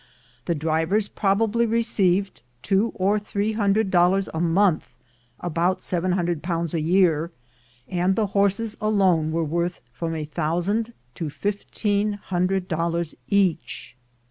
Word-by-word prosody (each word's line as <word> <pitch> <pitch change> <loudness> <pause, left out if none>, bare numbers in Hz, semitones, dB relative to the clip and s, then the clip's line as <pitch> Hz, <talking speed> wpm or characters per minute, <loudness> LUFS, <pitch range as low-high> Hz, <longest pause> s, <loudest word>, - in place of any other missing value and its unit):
The 170 - 0
drivers 160 +7 0
probably 220 +3 +1
received 200 -4 +1 0.2
two 200 +3 +2
or 200 +3 +2
three 205 +1 -2
hundred 210 -1 +1
dol 175 -1 +5
lars 195 0 0
a 160 - -2
month 175 0 +2 0.5
(about 175 +2 0
£700 175 -2 -1
a 165 - 0
year), 170 -1 +3 0.6
and 180 +1 +1
the 220 - +1
horses 200 +2 +1
alone 190 -7 +2
were 165 +1 0
worth 170 +3 -1
from 165 +4 -3
a 155 -1 -3
thousand 175 +10 -1 0.2
to 160 +1 -4
fifteen 205 +3 -1
hundred 185 -1 -1
dollars 170 -1 -1 0.2
each. 185 - 0
185 Hz, 125 wpm, -24 LUFS, 170-205 Hz, 0.6 s, dol